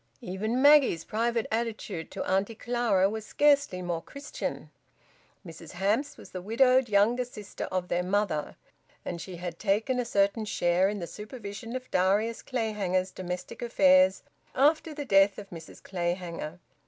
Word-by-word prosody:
Even 220 +5 -2
Maggie's 285 - +6
private 230 +1 -1
attitude 220 -6 -3
to - - -5
Auntie 195 +4 0
Clara 230 -5 +1
was 220 +2 -4
scarcely 280 -8 +2
more 170 -2 -2
Christian. 280 - -6 0.7
Mrs 165 -1 -11
Hamps 215 +11 0
was - - -13
the 185 - -6
widowed 255 +4 +3
younger 215 +5 +3
sister 215 -5 -7
of 185 -1 -3
their 175 - 0
mother, 180 -4 -1 0.5
and 170 -1 -4
she 185 - -7
had 175 -1 -6
taken 220 +5 +1
a - - +1
certain 200 0 +1
share 180 -1 +2
in 210 - -3
the 175 - -4
supervision 215 +3 -8
of 255 0 -6
Darius 205 +5 +1
Clayhanger's 200 -6 -1
domestic 180 -1 -6
affairs 190 -5 +4 0.3
after 310 +4 +3
the 290 -1 -5
death 195 -3 +4
of 200 -1 -10
Mrs 165 -2 -11
Clayhanger. 175 -3 -3
200 Hz, 150 wpm, -28 LUFS, 185-235 Hz, 0.7 s, Maggie's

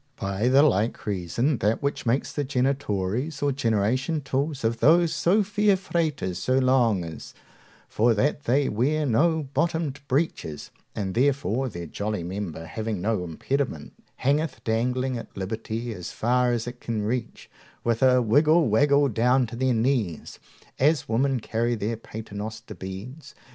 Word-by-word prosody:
By 100 +4 -1
the 135 +3 +6
like 115 -6 +1
reason, 105 - -1
that 110 +6 0
which 140 -3 -2
makes 125 +5 0
the 145 - -1
genitories 130 0 -1
or 145 - +2
generation 130 +5 0
tools 135 +1 -2
of 115 +1 0
those 170 +2 +4
so 200 +5 +3
fair 205 0 +2
fraters 155 - -2
so 130 +7 +1
long 125 -7 +3
is, 80 -2 -9 0.5
for 115 +1 +2
that 145 +6 0
they 135 +4 +2
wear 145 +8 +1
no 155 +6 +2
bottomed 160 -4 0
breeches, 130 - -2 0.2
and 95 -3 -3
therefore 130 -1 +1
their 85 -5 -7
jolly 100 +3 -3
member, 90 -3 -5
having 110 +3 -4
no 105 0 0
impediment, 90 - -3 0.2
hangeth 145 +1 0
dangling 125 +2 0
at - - -12
liberty 110 +4 -4
as 90 -3 -7
far 125 +2 +1
as 120 -1 -1
it 120 0 -8
can 110 -3 -2
reach, 115 +2 -3 0.4
with 115 -1 0
a 125 -1 +5
wiggle 150 +5 +4
waggle 140 +6 +4
down 125 +2 +2
to 115 - -8
their 130 0 +1
knees, 115 - -1 0.4
as 150 +3 +2
women 130 +3 +1
carry 115 +2 -1
their 110 +1 -2
paternoster 110 0 -7
beads. 100 +11 -9
120 Hz, 150 wpm, -25 LUFS, 110-140 Hz, 0.5 s, the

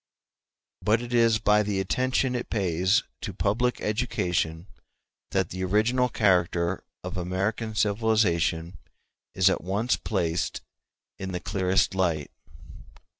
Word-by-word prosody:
] - - -65
But 110 +3 +2
it 120 0 -6
is 115 -2 +4
by 105 -1 +3
the 105 -2 -1
attention 130 +6 0
it 120 -1 -3
pays 95 -1 +1 0.2
to - - -5
Public 110 +7 0
Education 90 -7 -1 0.6
that 95 -3 0
the 95 +1 -4
original 115 +7 +2
character 90 -4 +1 0.2
of - - -5
American 100 +5 -2
civilization 100 -6 +1 0.6
is 95 0 +4
at 95 - +2
once 100 +7 0
placed 85 -5 -2 0.6
in 95 -1 -5
the 90 - -2
clearest 95 0 +1
light. 85 -6 0
100 Hz, 125 wpm, -26 LUFS, 90-110 Hz, 0.6 s, is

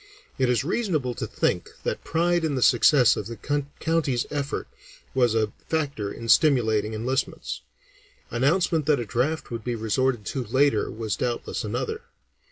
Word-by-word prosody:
It 130 -1 +3
is 125 +1 +2
reasonable 155 - -1
to - - -4
think - - -1
that - - -2
pride 175 +1 +1
in 155 -3 0
the 130 - +1
success 125 +2 +5
of 105 - -4
the 115 0 -7 0.4
county's 155 -7 0
effort 145 -2 -3 0.5
was 120 -4 +3
a 110 -2 +1 0.2
factor 140 -11 -1
in 115 - -7
stimulating 110 -7 +3
enlistments; 125 +4 -2 0.7
announcement 155 +5 +2
that 150 -3 +4
a 120 - -3
draft 125 +9 -1
would 115 -2 -4
be 120 0 -2
resorted 115 +1 0
to 130 - -2
later 130 0 +2
was 110 -2 -3
doubtless 120 -1 -2
another. - - -3
125 Hz, 155 wpm, -25 LUFS, 115-150 Hz, 0.7 s, success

